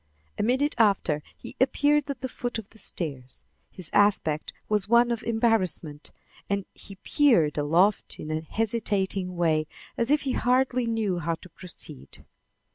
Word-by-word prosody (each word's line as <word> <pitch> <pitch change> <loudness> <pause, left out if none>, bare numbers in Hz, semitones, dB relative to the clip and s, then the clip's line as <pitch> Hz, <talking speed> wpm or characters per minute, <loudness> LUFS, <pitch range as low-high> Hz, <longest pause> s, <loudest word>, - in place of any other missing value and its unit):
A - - +2
minute 260 +6 +2
after 195 -8 +2 0.2
he - - -10
appeared 290 +2 +2
at 270 -3 -5
the 260 - -2
foot 245 -1 -4
of 220 -3 -7
the 220 - -11
stairs. 135 - -2 0.3
His 175 -3 -9
aspect 195 -7 +2 0.2
was 210 -2 0
one 235 +1 +5
of 235 - -2
embarrassment, 215 -10 0 0.4
and 200 -1 -1
he 195 - -12
peered 190 - +2
aloft 170 +8 +1
in 155 - -6
a 155 0 -1
hesitating 195 -1 -2
way, 160 -3 +1 0.3
as 235 +1 +1
if 295 +1 +3
he 270 - -2
hardly 250 -1 +1
knew 215 -6 -1
how 165 0 -1
to 185 - -15
proceed. 160 - -10
205 Hz, 155 wpm, -26 LUFS, 165-235 Hz, 0.4 s, one